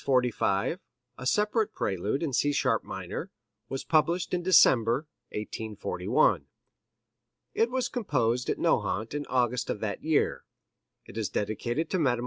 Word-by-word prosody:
45, 125 - +1 0.4
a 125 - -6
separate 210 - +1
Prelude 100 - -1
in 145 -5 -2
C 145 +3 +2
sharp 130 -5 +1
minor, - - -5 0.4
was 135 - -3
published 170 +3 +1
in 180 - +1
December, 135 -7 +5 0.2
1841. 105 0 0 1.1
It 230 - +2
was 255 -1 0
composed 125 - 0
at - - 0
Nohant 110 +5 0
in 145 0 -3
August 125 -1 0
of - - -2
that 105 -2 -3
year. 155 -1 +1 0.6
It - - -11
is - - -1
dedicated 120 +9 -2
to 185 - +1
Mme. 125 -6 +2
130 Hz, 135 wpm, -28 LUFS, 115-165 Hz, 1.1 s, December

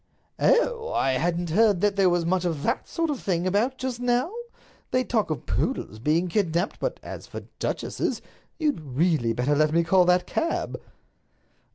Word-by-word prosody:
"Oh! 485 -1 +2
I 135 - +1
hadn't 170 +5 -1
heard 210 0 +4
that 205 -1 +2
there 195 -2 +4
was 175 -1 +1
much 185 +1 +1
of 165 -5 -2
that 235 - -1
sort 330 -2 -1
of 280 - -4
thing 175 -2 -1
about 215 +8 +1
just 255 -2 -4
now. 245 - +1 0.6
They 255 - +1
talk 225 -6 0
of 155 - -4
poodles 110 - -2
being 155 +8 +1
kidnaped, 175 -1 0
but - - -2
as - - -8
for - - -7 0.2
duchesses—You'd 305 - -3
really 145 -3 +1
better 125 +5 0
let 155 +1 +3
me 170 +1 +3
call 180 +2 +4
that 180 0 +3
cab." 330 +1 -2
180 Hz, 170 wpm, -25 LUFS, 165-245 Hz, 0.6 s, heard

